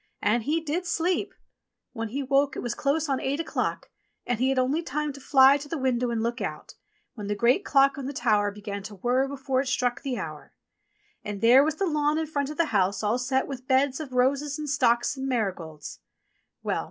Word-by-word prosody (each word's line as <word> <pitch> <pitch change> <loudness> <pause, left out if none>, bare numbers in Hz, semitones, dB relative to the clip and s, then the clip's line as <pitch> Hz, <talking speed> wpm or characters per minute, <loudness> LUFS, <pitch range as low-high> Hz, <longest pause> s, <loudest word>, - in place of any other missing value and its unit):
And 230 +3 +2
he 300 +8 0
did 325 +3 -3
sleep! 345 +2 0 0.6
When 225 -2 -3
he 275 +5 -3
woke 275 +1 +2
it - - -5
was 240 -1 -2
close 290 +5 0
on 270 -2 0
eight 275 +3 -1
o'clock, 330 - -3 0.3
and 245 -2 -1
he 260 +1 +2
had 270 - 0
only 265 +6 +1
time 300 -1 -3
to 275 - -12
fly 270 +1 +6
to 290 - -9
the 330 - -2
window 250 -2 0
and 230 -1 -1
look 235 +1 -2
out, - - -5 0.4
when 210 -3 -7
the 205 - -1
great 240 - +3
clock 275 0 +3
on 265 - -4
the - - -3
tower 215 -6 +1
began 200 0 -6
to 205 +1 -9
whirr 250 +7 +1
before 270 -1 -1
it 275 - -5
struck 250 -1 0
the 270 -3 -3
hour. 155 -5 -7 0.7
And 205 -1 -5
there 245 +6 +7
was 310 +1 0
the 390 - -1
lawn 300 -2 +1
in 320 - 0
front 285 -2 -2
of 300 - -7
the 335 - +3
house 195 0 +1
all 215 +4 +1
set 260 +1 0
with 260 -2 -8
beds 265 +1 +2
of 290 -5 -7
roses 275 +4 +1
and 305 -1 -5
stocks 240 -2 +2
and 270 0 -4
marigolds! 185 - -3 0.6
Well - - -1
265 Hz, 220 wpm, -26 LUFS, 235-285 Hz, 0.7 s, there